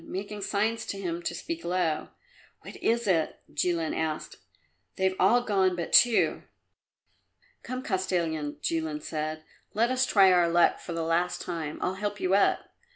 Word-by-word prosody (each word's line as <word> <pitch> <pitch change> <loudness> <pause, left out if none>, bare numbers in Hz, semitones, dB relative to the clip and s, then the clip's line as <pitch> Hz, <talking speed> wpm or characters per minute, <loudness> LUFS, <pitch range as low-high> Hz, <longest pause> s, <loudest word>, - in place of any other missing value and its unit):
making 205 +2 -5
signs 215 +3 0
to 200 - -5
him 175 -3 -3
to 170 - -3
speak 330 - -5
low. 175 -3 -1 0.5
"What - - -10
is 235 +1 0
it?" 170 -6 +1
Jilin 165 +1 0
asked. 160 -1 -3 0.6
"They've 190 -1 +1
all 235 +6 +4
gone 190 -5 +2
but 170 -1 -5
two." 240 -2 +5 1.2
"Come, 255 0 -5
Kostilin," 170 - -1
Jilin 160 -2 -2
said; 155 0 -4 0.3
"let 230 +3 +2
us 255 0 +2
try 195 -2 +6
our 175 -2 +4
luck 170 0 +3
for 170 - -7
the 165 0 -2
last 170 +2 0
time; 165 -4 -4
I'll 185 - 0
help 205 +1 -4
you 185 +1 0
up." 200 - +3
180 Hz, 155 wpm, -28 LUFS, 165-205 Hz, 1.2 s, try